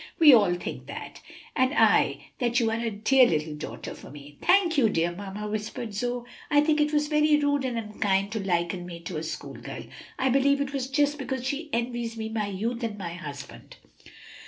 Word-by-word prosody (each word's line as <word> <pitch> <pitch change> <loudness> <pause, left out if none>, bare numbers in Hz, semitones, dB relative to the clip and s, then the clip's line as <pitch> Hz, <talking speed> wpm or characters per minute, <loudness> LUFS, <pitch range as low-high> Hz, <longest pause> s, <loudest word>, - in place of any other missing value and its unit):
We 305 -4 +8
all 200 -7 +5
think 175 - -6
that, - - -8 0.3
and 260 +3 +2
I - - +3
that 240 -1 +2
you 225 -2 +1
are 225 - -1
a 230 0 -1
dear 245 +5 +4
little 155 -3 -1
daughter 150 - -7
for - - -12
me." 145 0 -12
"Thank 365 -3 +4
you, 250 -6 +4
dear 170 -2 +1
mamma," 200 +3 -6
whispered 215 +1 -4
Zoe. 245 +3 -2 0.2
"I 290 -1 +5
think 300 0 +3
it 295 0 +2
was 295 -1 +1
very 300 0 +4
rude 285 -1 +1
and 245 -2 -2
unkind 205 -2 0
to 220 - -2
liken 175 -1 -1
me 170 -1 -8
to 170 - -5
a - - -3
school 160 - -6
girl. - - -8 0.3
I 265 - +1
believe 275 +2 +3
it 280 0 -2
was 265 -2 -2
just 290 +1 +1
because 265 -2 -3
she 290 +4 -3
envies 235 -1 -2
me 220 0 -4
my 220 -2 -2
youth 225 +5 -3
and 225 -3 -3
my 170 -4 -5
husband." 145 -5 -9
230 Hz, 205 wpm, -27 LUFS, 195-275 Hz, 0.3 s, We